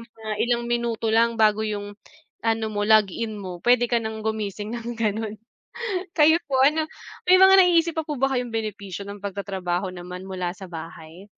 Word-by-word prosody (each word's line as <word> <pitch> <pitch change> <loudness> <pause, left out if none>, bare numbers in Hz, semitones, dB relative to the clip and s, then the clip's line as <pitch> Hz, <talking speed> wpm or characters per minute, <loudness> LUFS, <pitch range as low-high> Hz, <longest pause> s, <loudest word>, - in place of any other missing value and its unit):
mga 225 -2 -10
ilang 240 0 0
minuto 235 -1 -1
lang 230 0 +3
bago 215 -1 +4
'yong 205 -1 -4 0.5
ano 225 -1 +1
mo, 205 0 -1
log-in 215 +1 +2
mo, 180 -2 -7
puwede 245 0 +5
ka 235 -1 +2
nang 220 -1 -5
gumising 215 -1 -3
ng 235 0 -5
gano'n. 215 -1 -2 0.8
Kayo 320 +1 +6
po 270 - -3
ano 310 +2 +3 0.4
may 370 - +8
mga 380 0 +8
naiisip 340 -2 +4
pa - - +1
po 300 - -3
ba 270 0 +2
kayong 245 -2 -2
benepisyo 200 -3 -4
ng 205 - -8
pagtatrabaho 190 -2 -3
naman 180 +1 -8
mula 180 -2 -3
sa 190 - -9
bahay? 165 +2 -9
220 Hz, 175 wpm, -24 LUFS, 200-235 Hz, 0.8 s, may